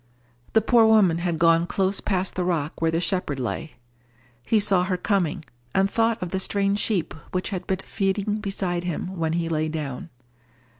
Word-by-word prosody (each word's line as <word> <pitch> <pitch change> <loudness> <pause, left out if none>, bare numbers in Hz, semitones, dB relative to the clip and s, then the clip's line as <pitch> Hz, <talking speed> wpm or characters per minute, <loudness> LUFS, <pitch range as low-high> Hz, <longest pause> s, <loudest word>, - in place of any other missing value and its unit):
The 220 - +5
poor 230 -1 +5
woman 200 -7 +4
had 170 -1 -1
gone 165 +1 +4
close 195 +1 0
past 190 -2 0
the 185 - -1
rock 165 -4 -2
where 165 - +3
the 165 0 0
shepherd 175 -6 -1
lay. 140 +5 -4 0.7
He 220 - +3
saw 195 -3 +4
her 185 -1 -1
coming, 180 -4 0 0.3
and 195 +1 +3
thought 225 0 +1
of 175 - -5
the 190 - -1
strange 200 +1 0
sheep 195 -8 -1 0.2
which 185 0 -1
had 185 -3 -4
been 190 - 0
feeding 200 +1 -1
beside 195 -4 -2
him 180 +2 -4
when 165 -2 -1
he 170 0 -1
lay 155 -1 -1
down. 150 -2 -5
185 Hz, 185 wpm, -24 LUFS, 165-200 Hz, 0.7 s, The